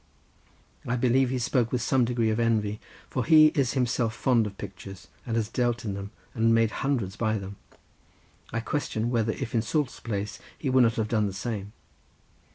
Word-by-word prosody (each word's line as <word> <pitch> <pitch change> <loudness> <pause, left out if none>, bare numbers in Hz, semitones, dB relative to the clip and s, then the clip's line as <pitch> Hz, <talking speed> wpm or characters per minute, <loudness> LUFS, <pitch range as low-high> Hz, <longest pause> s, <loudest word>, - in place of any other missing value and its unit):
I 120 - +1
believe 125 +1 +3
he 130 - -1
spoke 125 -1 +1
with 125 -2 0
some 130 -2 +3
degree 115 -2 +1
of 110 - -1
envy, 110 -3 +1 0.3
for 130 - -2
he 155 0 +7
is 140 -7 +1
himself 120 -4 0
fond 115 -1 +2
of 100 -1 -9
pictures, 95 -5 -9 0.2
and 115 - -1
has 110 -2 0
dealt 120 0 -1
in 100 - -2
them, 100 0 -6 0.2
and 115 -1 +3
made 115 -1 +3
hundreds 120 -9 -1
by 110 -1 0
them. 100 0 -7 0.9
I 115 - -1
question 115 -3 -2
whether 115 -2 +1
if 115 - -5
in 115 - +2
Soult's 145 +4 -1
place 105 -2 -4 0.2
he 135 - -2
would 130 0 +5
not 115 -1 +3
have 110 -1 0
done 105 -3 +2
the 100 - -5
same. 100 0 -4
115 Hz, 190 wpm, -27 LUFS, 105-125 Hz, 0.9 s, he